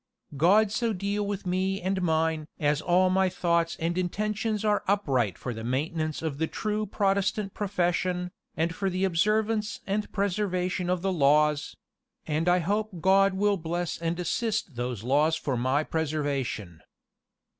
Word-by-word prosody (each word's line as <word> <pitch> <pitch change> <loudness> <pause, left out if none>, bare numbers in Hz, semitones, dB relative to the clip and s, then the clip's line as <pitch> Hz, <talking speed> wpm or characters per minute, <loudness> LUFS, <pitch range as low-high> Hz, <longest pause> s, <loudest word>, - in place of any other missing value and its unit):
"God 195 +8 +4
so 230 0 0
deal 200 +2 -2
with 205 -1 -4
me 190 +2 0
and 190 +1 -1
mine 160 -2 +1
as 150 0 +1
all 185 +1 +3
my 190 0 +3
thoughts 170 -2 0
and 170 +2 -1
intentions 210 +3 -1
are 210 -1 +2
upright 135 - +1
for 125 - -4
the 110 0 -7
maintenance 155 +6 -2
of 150 -3 -3
the 160 - +1
true 215 +3 -2
Protestant 200 +1 0
profession, 180 -2 -1 0.3
and 165 +1 0
for 195 +3 -1
the 185 +1 -2
observance 210 +4 +1
and 205 +2 -2
preservation 185 -2 -1
of 180 -1 0
the 195 -1 +1
laws; 150 -1 +2 0.5
and 160 +3 0
I 180 - +5
hope 200 +2 -1
God 195 +2 +4
will 205 +1 +2
bless 170 +1 -3
and 165 +1 -2
assist 215 - -1
those 120 -3 -3
laws 150 +6 +3
for 140 -4 -2
my 130 +5 +1
preservation." 140 - -2
180 Hz, 155 wpm, -27 LUFS, 155-200 Hz, 0.5 s, I